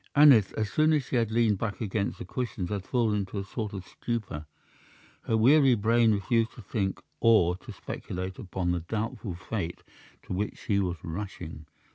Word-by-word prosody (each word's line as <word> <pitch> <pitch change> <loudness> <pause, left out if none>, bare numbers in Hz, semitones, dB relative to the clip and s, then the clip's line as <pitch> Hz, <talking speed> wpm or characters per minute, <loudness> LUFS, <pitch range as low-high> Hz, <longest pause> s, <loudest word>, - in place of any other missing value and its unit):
Aneth, 140 -9 +7
as 110 -2 -2
soon 155 +1 +4
as 150 -3 +2
she - - -3
had 115 -2 +1
leaned 110 -3 +2
back 105 -3 -3
against 105 -2 -1
the - - -7
cushions, 115 -8 -3
had 100 -2 -3
fallen 115 -4 +2
into 100 +1 -4
a 100 - -1
sort 105 +2 -4
of 95 -2 -6
stupor. 100 -11 -4 0.8
Her 110 - +2
weary 135 +3 +6
brain 115 +1 +4
refused 110 +3 +1
to 120 - -11
think 95 -1 -2 0.2
or 95 -7 +5
to 115 +4 -10
speculate 95 -1 -6
upon 90 -2 -2
the 90 - 0
doubtful 105 +1 -4
fate 90 -1 -4 0.4
to - - -5
which 100 +3 -2
she 100 -1 0
was 90 -3 -1
rushing. 85 -3 -6
105 Hz, 180 wpm, -28 LUFS, 95-115 Hz, 0.8 s, Aneth